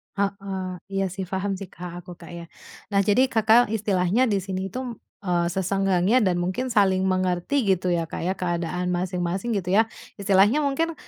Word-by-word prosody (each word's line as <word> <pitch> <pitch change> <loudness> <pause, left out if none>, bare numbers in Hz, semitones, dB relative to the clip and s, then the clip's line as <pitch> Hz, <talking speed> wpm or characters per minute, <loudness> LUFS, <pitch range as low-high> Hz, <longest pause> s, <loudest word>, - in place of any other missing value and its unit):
Heeh. 195 -2 -3 0.2
Iya 195 0 +1
sih, 190 0 -4
paham 195 +2 -2
sih, 195 - -7
Kak. 175 0 -8
Aku, 180 -1 -10
Kak, 170 0 -12
ya. 170 0 -8 0.5
Nah, 200 - +4
jadi 215 +7 +4
Kakak 225 0 +4
istilahnya 205 +1 +1
di 200 -2 +2
sini 190 0 -4
itu, 255 - -4
m - - -4 0.3
eee, 175 -2 +1
sesenggangnya 195 +4 +2
dan 185 -4 +2
mungkin 185 +9 -2
saling 195 -5 +3
mengerti 185 +7 0
gitu 185 0 -2
ya, 170 -1 +1
Kak, - - -6
ya, 185 - 0
keadaan 175 0 -2
masing-masing 180 +4 -2
gitu 185 0 -2
ya. 225 +2 +4 0.3
Istilahnya 200 +7 +4
mungkin, 325 +4 0
190 Hz, 180 wpm, -24 LUFS, 180-205 Hz, 0.5 s, Nah